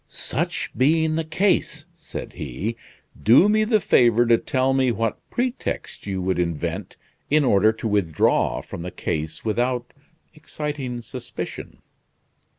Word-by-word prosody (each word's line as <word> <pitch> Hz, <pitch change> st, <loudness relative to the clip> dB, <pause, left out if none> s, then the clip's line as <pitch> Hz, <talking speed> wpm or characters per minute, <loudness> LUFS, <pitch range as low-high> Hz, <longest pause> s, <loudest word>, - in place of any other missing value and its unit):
"Such -, -, -3 dB
being 155 Hz, +4 st, +3 dB
the 165 Hz, -, 0 dB
case," 185 Hz, +6 st, 0 dB
said -, -, -8 dB
he, 75 Hz, -, -4 dB, 0.5 s
"do 120 Hz, -, +6 dB
me 215 Hz, +1 st, +3 dB
the 215 Hz, 0 st, +3 dB
favor 120 Hz, -, +4 dB
to 115 Hz, -1 st, +4 dB
tell 130 Hz, 0 st, +1 dB
me 130 Hz, -2 st, +3 dB
what 115 Hz, -1 st, -1 dB
pretext 245 Hz, -, -3 dB
you 95 Hz, -2 st, -2 dB
would 95 Hz, -1 st, 0 dB
invent 85 Hz, -3 st, -3 dB, 0.3 s
in 150 Hz, 0 st, +4 dB
order 110 Hz, -2 st, +4 dB
to 110 Hz, -, -4 dB
withdraw 85 Hz, -, +1 dB
from -, -, -8 dB
the 90 Hz, -, -4 dB
case 80 Hz, -1 st, -4 dB
without 120 Hz, +2 st, -1 dB, 0.4 s
exciting 145 Hz, -5 st, -5 dB
suspicion?" 120 Hz, +1 st, -7 dB
120 Hz, 135 wpm, -23 LUFS, 100-150 Hz, 0.5 s, do